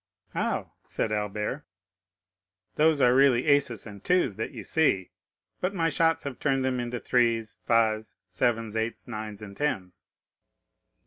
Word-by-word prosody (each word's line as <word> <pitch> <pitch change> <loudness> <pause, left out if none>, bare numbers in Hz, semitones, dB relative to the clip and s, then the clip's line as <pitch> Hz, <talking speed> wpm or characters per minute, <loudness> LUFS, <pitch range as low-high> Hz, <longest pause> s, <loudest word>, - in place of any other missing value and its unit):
"How?" - - -2
said 110 - -2
Albert. 105 +6 -2 1.1
"Those 155 -1 +3
are 125 -1 +6
really 130 -2 +4
aces 140 -7 +2
and 100 -3 -10
twos 175 - +2
which 110 - -4
you 115 -7 -8
see, 95 - +1 0.5
but 185 +2 -1
my 165 -2 +2
shots 165 +1 +2
have 140 -3 -6
turned 135 -2 +1
them 130 -1 0
into 120 0 -3
threes, 115 -4 +1
fives, 110 -2 +2
sevens, 110 +4 -1
eights, 110 +1 -3
nines, 110 -2 -6
and 100 -2 -9
tens." 95 -11 -3
120 Hz, 140 wpm, -27 LUFS, 110-140 Hz, 1.1 s, are